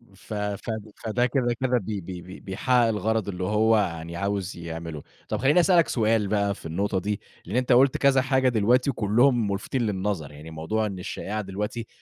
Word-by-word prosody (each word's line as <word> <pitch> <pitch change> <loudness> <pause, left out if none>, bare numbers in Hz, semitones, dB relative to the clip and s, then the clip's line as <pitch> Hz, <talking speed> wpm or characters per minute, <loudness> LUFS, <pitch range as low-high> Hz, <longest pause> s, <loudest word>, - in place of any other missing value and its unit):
ف 110 - -10
فد 105 +1 -3
فده 120 +2 +1
كده 120 -1 +1
كده 125 -1 +2
بي 100 -2 -3
بي 90 0 -7
بي 95 +2 -11
بيحقق 120 +5 +1
الغرض 110 -1 0
اللي 90 -1 -4
هو 110 +3 +3
يعني 85 -4 -2
عاوز 100 -1 -2
يعمله. 80 -2 -6 0.3
طب، - - 0
خلّيني 145 +7 +4
أسألك 175 -2 +5
سؤال 110 -3 +1
بقى 100 -1 +1
في - - -15
النقطة 95 +4 -1
دي، 105 +2 -3 0.2
لأن 100 +7 -5
أنت 125 0 +1
قُلت 130 +2 +5
كذا 135 -1 +4
حاجة 130 -1 +2
دلوقتي 120 +4 +3
وكلهم 115 -1 +2
مُلفتين 115 +6 -2
للنظر. 95 -7 -2
يعني 75 +2 -11
موضوع 110 +8 -1
إن 95 -3 -4
الشائعة 105 +4 -4
دلوقتي 105 +4 -4
105 Hz, 185 wpm, -25 LUFS, 95-120 Hz, 0.3 s, أسألك